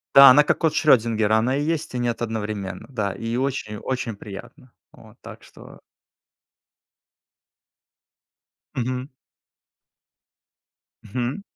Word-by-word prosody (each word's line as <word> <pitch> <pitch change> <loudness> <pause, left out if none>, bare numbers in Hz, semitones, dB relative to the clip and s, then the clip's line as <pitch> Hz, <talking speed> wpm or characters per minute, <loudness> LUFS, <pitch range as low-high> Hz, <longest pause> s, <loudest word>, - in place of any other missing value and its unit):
Да 140 0 +11
она 145 +4 +7
как - - 0
кот 160 -3 +1
Шрёдингера, 110 -6 +3
она 125 +5 +1
и 145 - -1
есть, 160 -2 -2
и 125 - -2
нет 120 -1 -2
одновременно, 105 -4 -4
да, 105 -7 -2
и 115 +3 -4
очень-очень 125 -2 -3
приятно. 115 +6 -11 0.2
Вот, - - -17
так - - -12
что - - -15 3.0
Мгм. 125 +1 -3 2.0
Хм. 120 - -3
120 Hz, 105 wpm, -23 LUFS, 110-135 Hz, 3.0 s, Да